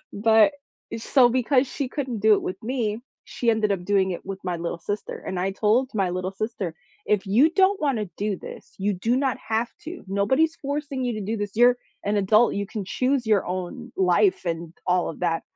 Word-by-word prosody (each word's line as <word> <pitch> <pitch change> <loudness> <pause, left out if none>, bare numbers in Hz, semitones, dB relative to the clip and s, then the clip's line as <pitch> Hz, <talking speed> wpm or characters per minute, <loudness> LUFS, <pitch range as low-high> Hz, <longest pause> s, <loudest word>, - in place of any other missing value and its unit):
but 220 +4 +4 0.4
eh, - - -3
so, 245 +2 +4
because 255 +2 +2
she 265 0 -4
couldn't 255 -6 -4
do 215 -1 +6
it - - -1
with 185 +3 -5
me, 230 -3 -2 0.2
she 235 - 0
ended 215 -2 +1
up 180 -2 -3
doing 195 -1 +2
it - - -7
with 195 -1 -5
my 180 -2 -1
little 170 0 -4
sister, 205 +4 -4
and 185 - -3
I 190 - 0
told 230 +6 +2
my 195 -4 +1
little 185 +1 -2
sister, 195 -5 -4 0.3
"If 210 -1 +1
you 245 +11 +4
don't 385 +3 +3
wanna 250 -8 0
do 205 -1 -1
this, - - -11
you 200 +2 0
do 225 +7 0
not 265 -2 0
have 225 +2 0 0.2
to, 335 +2 -8
nobody's 265 +12 +2
forcing 280 -2 -3
you 245 - 0
to 215 - -4
do 220 +3 -2
this, 205 -1 -4
you're 245 +1 +6 0.3
an 205 +1 0
adult, 210 +4 +4
you 200 0 -2
can 210 -1 -5
choose 255 +4 0
your 210 -3 +2
own 180 -1 -5
life 185 +1 +3
and 165 -1 -3
all 180 -1 +2
of 165 - -11
that," 165 -2 0
215 Hz, 210 wpm, -24 LUFS, 190-250 Hz, 0.4 s, do